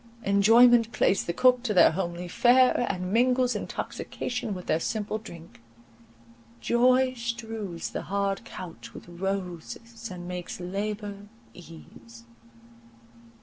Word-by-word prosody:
Enjoyment 230 +4 +5
plays 195 - +2
the - - -2
cook 250 +6 +3
to 225 -4 -2
their - - +7
homely 175 0 -4
fare, 245 +5 +4
and 185 0 -4
mingles 250 +1 +2
intoxication 245 -5 -4
with 180 - -8
their 160 - +1
simple 215 +4 -3
drink. 170 - -13 1.0
Joy 255 - +3
strews 225 -6 -5
the - - -4
hard 200 0 -2
couch 180 -3 -10
with - - -11
roses, 195 +5 -5
and 175 -1 -8
makes 180 -1 -6
labour 205 +2 -5 0.3
ease. 115 -9 -14
200 Hz, 115 wpm, -27 LUFS, 180-235 Hz, 1.0 s, their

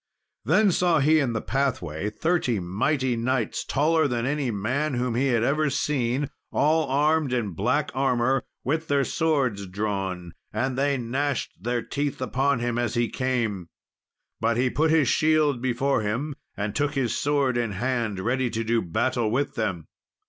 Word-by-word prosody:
Then 190 - +4
saw 175 -1 +3
he 155 +3 +4
in 130 -5 0
the 110 - -2
pathway 105 - -1
thirty 125 - 0
mighty 125 - 0
knights, 120 0 -1
taller 160 +2 +2
than 120 -3 -1
any 140 -1 -1
men 125 +8 -1
whom 125 0 -1
he 130 +4 +1
had 120 -3 +2
ever 150 +3 +2
seen, 140 -1 -1 0.2
all 155 +2 +2
armed 150 +1 +2
in 120 -5 -1
black 125 - 0
armour, 130 0 +1 0.2
with 160 +4 -1
their 140 -1 +2
swords 130 -9 0
drawn; 95 -3 -3 0.2
and 130 0 -1
they 140 +1 +1
gnashed 130 +3 -2
their 120 +2 -1
teeth 145 0 -3
upon 130 +1 0
him 120 0 -1
as 120 -1 -1
he 120 -1 +1
came. 115 -9 -1 0.7
But 115 - +1
he 125 0 +2
put 160 +2 +2
his 155 -4 +4
shield 155 -4 +2
before 130 +1 +1
him, 120 +9 -2 0.2
and 105 0 -2
took 145 +2 0
his 125 -4 0
sword 140 -3 +1
in 115 -3 -1
hand, 115 -2 -1
ready 125 +3 0
to 115 0 -2
do 115 0 +1
battle 115 +5 0
with 135 +6 0
them. 95 -8 -2
130 Hz, 165 wpm, -25 LUFS, 115-145 Hz, 0.7 s, Then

